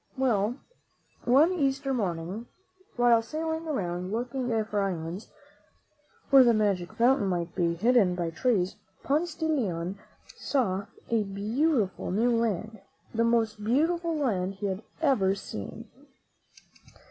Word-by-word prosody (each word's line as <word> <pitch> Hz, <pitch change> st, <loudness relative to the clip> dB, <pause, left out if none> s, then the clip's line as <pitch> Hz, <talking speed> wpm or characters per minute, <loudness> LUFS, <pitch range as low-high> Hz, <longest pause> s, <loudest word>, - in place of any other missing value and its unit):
Well, 235 Hz, -4 st, +1 dB, 0.7 s
one 280 Hz, +8 st, +5 dB
Easter 275 Hz, -4 st, 0 dB
morning, 190 Hz, 0 st, -3 dB, 0.5 s
while 240 Hz, -1 st, +5 dB
sailing 320 Hz, +5 st, -3 dB
around 180 Hz, -, -2 dB
looking 245 Hz, +3 st, -2 dB, 0.2 s
for 210 Hz, -1 st, -1 dB
islands, 180 Hz, 0 st, -4 dB, 1.0 s
where 270 Hz, -1 st, +9 dB
the 235 Hz, -2 st, +4 dB
magic 200 Hz, -5 st, 0 dB
fountain 240 Hz, -3 st, +3 dB
might 170 Hz, -2 st, -2 dB
be 170 Hz, -1 st, 0 dB
hidden 210 Hz, -1 st, +3 dB
by 170 Hz, -2 st, -2 dB
trees. 190 Hz, -1 st, 0 dB, 0.3 s
Ponce 315 Hz, +3 st, 0 dB
de 320 Hz, -, -3 dB
Leon 195 Hz, -, -1 dB, 0.4 s
saw 205 Hz, -7 st, -1 dB, 0.2 s
a 225 Hz, -2 st, +3 dB
beautiful 215 Hz, -, 0 dB
new 230 Hz, +5 st, +2 dB
land, 220 Hz, -1 st, -1 dB, 0.3 s
the 230 Hz, 0 st, +2 dB
most 225 Hz, -2 st, +1 dB
beautiful 325 Hz, +8 st, +1 dB
land 195 Hz, -9 st, -1 dB
he 205 Hz, -, -5 dB
had 195 Hz, 0 st, -2 dB, 0.2 s
ever 200 Hz, -10 st, +3 dB
seen. 105 Hz, -, -7 dB
225 Hz, 125 wpm, -28 LUFS, 190-265 Hz, 1.0 s, where